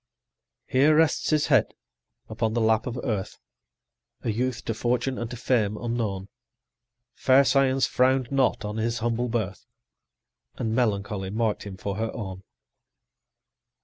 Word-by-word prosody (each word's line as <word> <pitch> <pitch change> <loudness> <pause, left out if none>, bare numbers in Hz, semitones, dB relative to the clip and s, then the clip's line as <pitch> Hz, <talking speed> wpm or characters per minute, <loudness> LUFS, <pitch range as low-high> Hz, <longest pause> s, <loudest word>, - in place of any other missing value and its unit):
Here 145 +4 +4
rests 160 -1 +2
his 155 -2 +2
head - - +2 0.5
upon 110 0 -2
the - - +2
lap 110 +2 +2
of 125 0 -4
Earth 105 -7 -3 0.9
A 115 - 0
youth, 120 +1 -2
to 115 - -1
Fortune 125 +3 -1
and 120 -1 -4
to 125 - -7
Fame 110 -4 +1
unknown; 110 -5 -3 0.9
Fair 135 +1 +4
Science 135 -1 +3
frown'd 130 -1 +2
not 135 -5 +1
on 105 +1 -4
his 115 +1 -1
humble 120 +2 -1
birth, 105 -5 -3 0.9
And 110 -1 -2
Melancholy 100 -5 -1
mark'd 110 0 -1
him 95 -2 -7
for 100 +1 -4
her 115 0 -1
own. 95 -4 -6
115 Hz, 140 wpm, -26 LUFS, 105-130 Hz, 0.9 s, Here